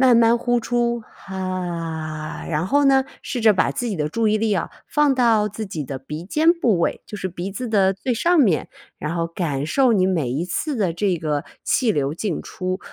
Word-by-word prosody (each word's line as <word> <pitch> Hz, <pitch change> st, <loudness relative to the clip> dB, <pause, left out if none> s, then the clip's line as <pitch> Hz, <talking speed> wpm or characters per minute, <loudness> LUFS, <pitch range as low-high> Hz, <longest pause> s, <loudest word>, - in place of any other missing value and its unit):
慢 255 Hz, -3 st, +6 dB
慢 235 Hz, 0 st, +5 dB
呼 245 Hz, 0 st, +1 dB
出， 235 Hz, 0 st, 0 dB
哈， 170 Hz, -5 st, -4 dB
然 160 Hz, +1 st, -1 dB
后 285 Hz, +6 st, +3 dB
呢， 270 Hz, -1 st, +5 dB, 0.2 s
试 245 Hz, -, -3 dB
着 220 Hz, -2 st, +7 dB
把 185 Hz, -, +2 dB
自 245 Hz, -, -3 dB
己 205 Hz, -5 st, -2 dB
的 150 Hz, -1 st, -1 dB
注 225 Hz, +5 st, +1 dB
意 215 Hz, -, +2 dB
力 225 Hz, +1 st, +1 dB
呀， 200 Hz, -4 st, 0 dB, 0.2 s
放 295 Hz, -2 st, +3 dB
到 230 Hz, -4 st, +3 dB
自 215 Hz, +2 st, -6 dB
己 160 Hz, -7 st, -4 dB
的 135 Hz, 0 st, -5 dB
鼻 150 Hz, +5 st, -7 dB
尖 315 Hz, -, +3 dB
部 230 Hz, -, +2 dB
位， -, -, 0 dB
就 210 Hz, -, -7 dB
是 185 Hz, -, -3 dB
鼻 180 Hz, +2 st, -5 dB
子 245 Hz, +4 st, -4 dB
的 195 Hz, -3 st, +3 dB
最 235 Hz, +6 st, -2 dB
上 345 Hz, +8 st, +3 dB
面。 190 Hz, -, +2 dB, 0.3 s
然 155 Hz, +3 st, -3 dB
后 165 Hz, 0 st, 0 dB
感 155 Hz, -5 st, -2 dB
受 255 Hz, -, +3 dB
你 185 Hz, -2 st, +3 dB
每 160 Hz, -10 st, 0 dB
一 145 Hz, +7 st, -1 dB
次 270 Hz, -, -2 dB
的 190 Hz, -6 st, +1 dB
这 185 Hz, +1 st, 0 dB
个 150 Hz, -3 st, -1 dB, 0.2 s
气 245 Hz, -5 st, +2 dB
流 145 Hz, -5 st, 0 dB
进 185 Hz, -2 st, -2 dB
出。 185 Hz, 0 st, -4 dB
195 Hz, 230 characters per minute, -22 LUFS, 165-235 Hz, 0.3 s, 着